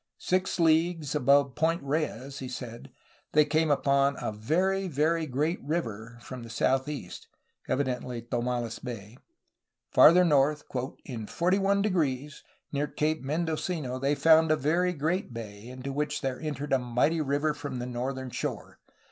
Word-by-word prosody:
Six 185 0 0
leagues 165 -2 +2
above 140 -1 +3
Point 160 +2 0
Reyes, 140 -2 -2
he 130 - -5
said, 120 -2 -8 0.4
they 150 0 +6
came 160 +1 +1
upon 140 -1 +3
"a - - -2
very, 185 - 0
very 160 +1 +1
great 150 +6 -1
river^' 115 -7 -4
from 130 -2 -8
the 115 - -9
southeast, 130 -2 -1 0.2
— - - -36
evidently 125 -3 -2
Tomales 120 -1 -2
Bay. 115 -1 -8 0.7
Farther 180 +2 +7
north 150 -1 +3 0.4
"in 115 -5 -6
41®, 180 - 0 0.3
near 145 +1 -1
Cape 155 +1 -1
Mendocino, 155 -2 -2
they 140 +2 +1
found 160 +2 +5
a 155 - +5
very 170 +6 +1
great 160 - -2
bay, 105 -1 -8
into 130 +2 -6
which 150 +1 -2
there 130 -2 -3
entered 145 -2 -3
a 135 - +4
mighty 125 +7 +1
river 145 +1 0
from 145 -3 -6
the 120 - -4
northern 130 +1 -4
shore. - - -5
140 Hz, 145 wpm, -28 LUFS, 125-160 Hz, 0.7 s, Farther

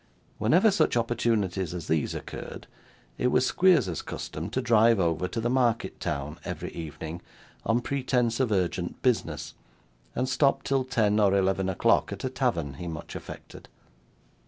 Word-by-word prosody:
Whenever 175 - +4
such 195 -10 +2
opportunities 105 -7 0
as 85 -3 -5
these 80 -2 0
occurred, - - -7 0.5
it - - +2
was 125 - +3
Squeers's 140 - +3
custom 80 +5 -6
to 125 - -1
drive 115 -3 +4
over 85 0 +1
to 115 - -4
the 115 - 0
market 120 -2 +1
town, 70 0 -3
every - - -5
evening, 80 +1 -7 0.5
on 115 +2 +2
pretence 125 -3 0
of 130 -4 +1
urgent 90 -2 -1
business, 80 - 0 0.6
and 130 - 0
stop 135 +1 +2
till 135 -1 +1
ten 110 -4 +1
or 100 -2 +4
eleven 95 -1 +1
o'clock 95 - +2
at - - -6
a - - -2
tavern 70 -5 -1
he 90 - -5
much 80 -2 -7
affected. - - -10
105 Hz, 155 wpm, -27 LUFS, 85-125 Hz, 0.6 s, Whenever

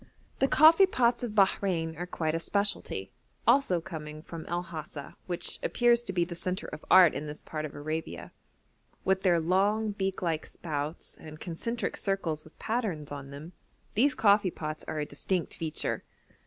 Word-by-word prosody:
The 270 - +4
coffee 320 +8 +7
pots 245 -8 +2
of 240 -4 -3
Bahrein 185 -5 +2
are 175 +2 -5
quite 160 -3 -1
a 165 - 0
specialty, 200 +4 -1 0.3
also 190 -11 +4
coming 155 -3 -8
from 165 -2 -8
El 175 +1 -1
Hasa, 155 -4 -8
which 175 -2 -1
appears 240 -1 +3
to 220 - -5
be 175 -2 +1
the 170 - -7
centre 185 +3 -3
of - - -8
art 180 -4 +8
in 145 +3 -4
this 150 +1 -7
part 155 -1 -4
of 150 - -8
Arabia. 155 +2 -4 0.7
With 190 0 +2
their 175 -3 +4
long 200 +6 +2
beak 195 -2 -2
like 165 -3 -1
spouts 150 -1 -5
and 155 0 -10
concentric 230 +10 -3
circles 170 -6 -2
with 155 - -18
patterns 205 -11 -2
on 140 -1 -6
them, 150 +5 -9 0.4
these 275 +7 +3
coffee 200 -2 +4
pots 155 -2 -5
are 160 - -3
a 150 - -1
distinct 165 +4 -2
feature. 160 -2 -3
175 Hz, 170 wpm, -29 LUFS, 155-200 Hz, 0.7 s, art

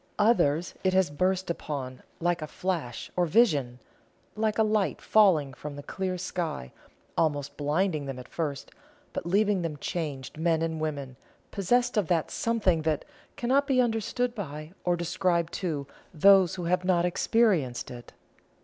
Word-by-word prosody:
Others 180 -7 +3
it 185 -1 +2
has 190 -5 +3
burst 185 +4 0
upon 135 -6 -5 0.2
like 175 0 0
a 155 - -4
flash, 165 -10 -3
or 180 -1 +2
vision 150 - +3 0.6
like 215 0 0
a 220 - +5
light 215 -2 +1
falling 170 -11 +4
from 145 +3 -7
the 145 - -8
clear 185 +2 -3
sky, 170 - -4 0.4
almost 145 -3 0
blinding 150 0 0
them 135 -2 -5
at 125 - -9
first, 145 -4 -4 0.4
but - - -4
leaving 200 +1 +2
them 160 -3 -3
changed 150 -2 -4
men 165 -1 +2
and 160 -1 -2
women, 140 -5 -4 0.3
possessed 240 +5 +1
of 205 -6 +2
that 165 -2 +1
something 205 -8 +1
that 155 -2 -1 0.3
cannot 270 +4 +2
be 265 -2 +3
understood 240 +1 0
by 155 -6 -7
or 175 -1 +3
described 170 0 0
to 155 -7 -2 0.3
those 190 +2 +5
who 180 - -5
have 180 +1 +1
not 180 -2 +2
experienced 180 - +1
it. 120 -2 -10
170 Hz, 155 wpm, -28 LUFS, 150-195 Hz, 0.6 s, a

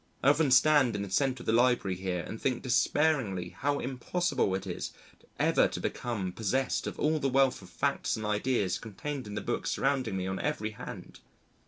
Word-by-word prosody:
I 135 - +6
often 145 0 +3
stand 135 -2 +5
in 100 - -2
the 100 - -7
centre 130 +2 +1
of - - -15
the - - +2
Library 120 -5 +3
here 90 -1 -2
and 110 - -8
think 125 -3 -1
despairingly 125 - +1
how 145 +6 -1
impossible 130 - -1
it 95 0 -4
is 90 -2 -4 0.5
ever - - +4
to - - -5
become 105 -7 -3
possessed 125 +7 -1
of - - -5
all 155 +1 +2
the 135 - 0
wealth 135 0 +3
of - - -13
facts - - -1
and 110 - -5
ideas 105 -1 0
contained 130 +4 -6
in 105 - -6
the 105 - -2
books 120 +4 -2
surrounding 130 -7 0
me 95 - -2
on 95 0 -3
every 110 +1 -2
hand. 110 - -9
120 Hz, 195 wpm, -30 LUFS, 100-135 Hz, 0.5 s, I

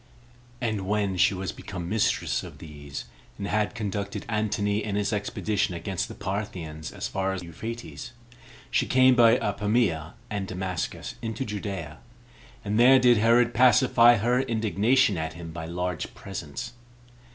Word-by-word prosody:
And 110 -5 -2
when 100 -2 0
she 95 +2 +3
was 95 0 -3
become 90 -3 -7
mistress 90 - +1
of - - -10
these, 70 -4 -8 0.3
and 100 - -4
had 105 +3 0
conducted 100 -3 -4
Antony 105 -2 0
in 100 -2 -3
his 105 +1 0
expedition 105 -2 -1
against 95 +1 -3
the - - -9
Parthians 90 -6 -5
as - - -4
far 95 0 -1
as 95 -2 -5
Euphrates, 115 +7 -7 0.6
she - - +2
came 130 0 +5
by 120 -1 +6
Apamia 105 -7 0
and 100 -2 -3
Damascus 90 -2 -4
into 115 +3 -3
Judea 95 -8 -5 0.7
and 105 +2 0
there 130 +2 +8
did 125 -2 +5
Herod 115 +2 +4
pacify 120 -1 +6
her 120 +4 +2
indignation 110 -2 +2
at 80 0 -3
him 85 0 -8
by 80 0 -6
large 90 +1 -3
presents. 100 - -6
105 Hz, 145 wpm, -26 LUFS, 90-115 Hz, 0.7 s, there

